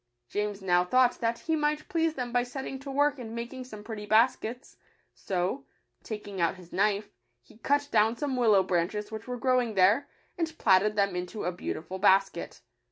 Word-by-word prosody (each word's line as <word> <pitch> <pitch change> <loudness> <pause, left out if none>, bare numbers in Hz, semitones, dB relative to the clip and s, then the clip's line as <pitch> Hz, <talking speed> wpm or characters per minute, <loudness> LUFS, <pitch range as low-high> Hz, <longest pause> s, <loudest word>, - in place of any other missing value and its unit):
James 205 - -3
now 180 -1 +3
thought 250 +6 +3
that 230 0 0
he 320 +5 -1
might 300 0 -1
please 325 -1 0
them 250 -2 -4
by 245 - +3
setting 265 +2 -5
to 275 +1 -9
work 285 +1 +1
and 230 -2 -7
making 240 +2 -5
some 215 -5 -10
pretty 210 -1 -7
baskets; 230 +2 +1 0.4
so, 190 +8 -2 0.4
taking 205 -4 -6
out 170 - +2
his 180 -2 -15
knife, 205 +1 +1 0.3
he 170 - -20
cut 285 +3 +1
down 220 +1 +3
some 285 -3 -2
willow 215 -6 +4
branches 190 +4 -1
which 220 +1 -7
were 250 0 -4
grow 255 +1 +3
ing 230 -3 -4
there, 200 +8 +4 0.3
and 325 -1 -2
platted 205 +1 +4
them 200 -2 +1
into 180 +4 -4
a 180 - 0
beautiful 180 +1 -5
basket. 195 0 +2
220 Hz, 185 wpm, -28 LUFS, 195-255 Hz, 0.4 s, willow